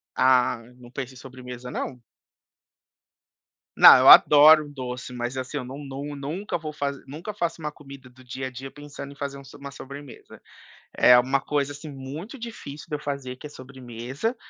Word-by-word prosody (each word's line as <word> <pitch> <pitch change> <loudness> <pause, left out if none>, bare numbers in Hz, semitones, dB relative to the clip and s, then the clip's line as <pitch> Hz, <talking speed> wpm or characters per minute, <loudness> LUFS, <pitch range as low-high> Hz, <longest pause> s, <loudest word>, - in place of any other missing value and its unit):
Ah, 125 -2 +3 0.2
não 120 -1 -14
penso 130 0 -6
em 130 - -15
sobremesa 125 -1 -10
não. 125 -2 -5 1.7
Não, - - +10
eu - - +6
adoro 150 +1 +8
um 145 - -12
doce, 125 -1 -6
mas 125 +1 -4
assim, 130 +3 -4
eu 130 - -4
nun 135 +3 -9
nun 140 +2 -6
nunca 160 +9 -4
vou 155 -2 -7
faz 140 -1 -3
nunca 165 +9 -7
faço 170 -4 -3
uma 150 0 -4
comida 140 -3 -14
do 130 +1 -19
dia 130 +1 -6
a - - -6
dia 130 +2 -8
pensando 145 -1 -10
em - - -20
fazer 140 0 -5
um 140 - -13
so 135 - -14
uma 140 0 -9
sobremesa. 140 0 -12 0.5
É 125 - +6
uma 130 +2 +1
coisa, 145 0 -1
assim, 145 +2 -10
muito 145 - -8
difícil 220 - -9
de 150 - -2
eu - - -11
fazer, 140 -3 -5
que 150 - -11
é - - -9
sobremesa, 130 - -6
140 Hz, 190 wpm, -25 LUFS, 130-145 Hz, 1.7 s, Não